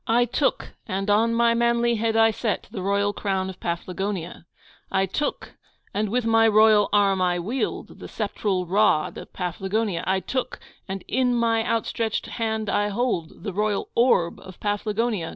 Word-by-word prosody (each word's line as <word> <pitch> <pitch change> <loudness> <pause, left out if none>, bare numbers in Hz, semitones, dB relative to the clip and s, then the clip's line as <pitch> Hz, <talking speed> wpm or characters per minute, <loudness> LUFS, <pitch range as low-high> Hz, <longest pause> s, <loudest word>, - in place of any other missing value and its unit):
I 240 +2 +4
took, 260 +4 -1 0.2
and 195 +2 -1
on 230 +3 +3
my 235 0 +4
manly 235 0 +2
head 225 +1 0
I 225 0 +5
set, 215 -1 -2
the 190 - -5
royal 200 +1 +1
crown 190 -2 -2
of 185 - -15
Paflagonia; 175 0 -4 0.4
I 190 0 +2
took, 285 +10 -3 0.4
and 210 0 -1
with 245 +2 0
my 225 0 +4
royal 215 -1 +5
arm 200 -2 +3
I 180 -1 +2
wield, 220 +10 -3
the - - -8
sceptral 200 -3 -2
rod 185 -5 +2
of - - -11
Paflagonia; 190 +1 -2
I 190 0 +2
took, 255 +6 -3 0.3
and 190 0 -5
in 250 0 +1
my 230 -1 +2
outstretched 225 -1 -1
hand 220 -2 -2
I 205 +1 +1
hold, 205 -6 -2
the 200 - -4
royal 210 +1 -1
orb 230 -8 +2
of 185 -1 -13
Paflagonia! 210 -2 -1
210 Hz, 165 wpm, -24 LUFS, 190-230 Hz, 0.4 s, I